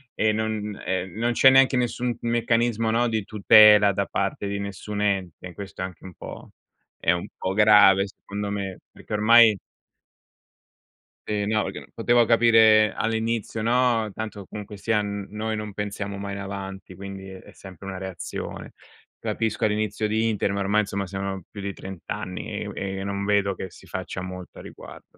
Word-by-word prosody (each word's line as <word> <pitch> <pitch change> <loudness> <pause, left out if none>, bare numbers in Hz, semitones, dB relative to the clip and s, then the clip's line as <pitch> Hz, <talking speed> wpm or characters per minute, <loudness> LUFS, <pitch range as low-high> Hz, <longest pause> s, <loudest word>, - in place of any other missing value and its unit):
e 110 0 +2
non 105 -2 -3
e 95 0 -1
non 120 +2 0
c'è 130 +2 +6
neanche 130 -1 +5
nessun 125 0 -1
m 120 - -5
meccanismo, 115 -1 +1
no, 120 +1 +2
di 110 -3 -1
tutela 105 0 +6
da 100 0 -1
parte 100 +1 -2
di 100 0 -3
nessun 100 +1 -5
ente. 95 -3 -2
Questo 100 -2 -8
è - - -1
anche 90 -3 -11
un 95 -1 -10
po' - - -10 0.5
è 85 - +2
un 90 -1 -2
po' 95 +1 -2
grave 105 -2 +6
secondo 100 +1 -6
me, 100 -2 -4
perché - - -10
ormai 110 +1 +6 1.7
Eh 105 -1 -1
no, 110 0 +1
perché - - -5
non - - -12
potevo 120 -1 +3
capire 110 -2 +5
all'inizio, 115 -1 -2
no. 120 -2 +2
Tanto 105 -2 -6
comunque 105 0 -8
sia 110 +1 0
n 100 -1 -4
noi 110 +1 -3
non 105 -1 -5
pensiamo 100 0 -4
mai 100 0 -5
in 100 - -6
avanti, 95 -1 -7
quindi 95 0 -8
è 95 - -12
sempre 95 -1 -12
una 95 - -5
reazione. 95 -2 -7 0.4
Capisco 110 -2 -2
all'inizio 105 0 0
di 110 +2 +1
internet, 100 -2 0
ma - - 0
ormai, 105 +2 +3
insomma, 100 -1 -3
siano 95 0 -4
più 100 - -8
di 100 0 -3
30 95 -3 -9
anni 90 0 -5
e - - -4
u - - -6
e 95 0 -4
non 100 0 -3
vedo 100 -1 +2
che 95 - -7
si - - -16
faccia - - -5
molto 90 0 -8
a - - -9
riguardo. - - -12
105 Hz, 180 wpm, -24 LUFS, 95-110 Hz, 1.7 s, c'è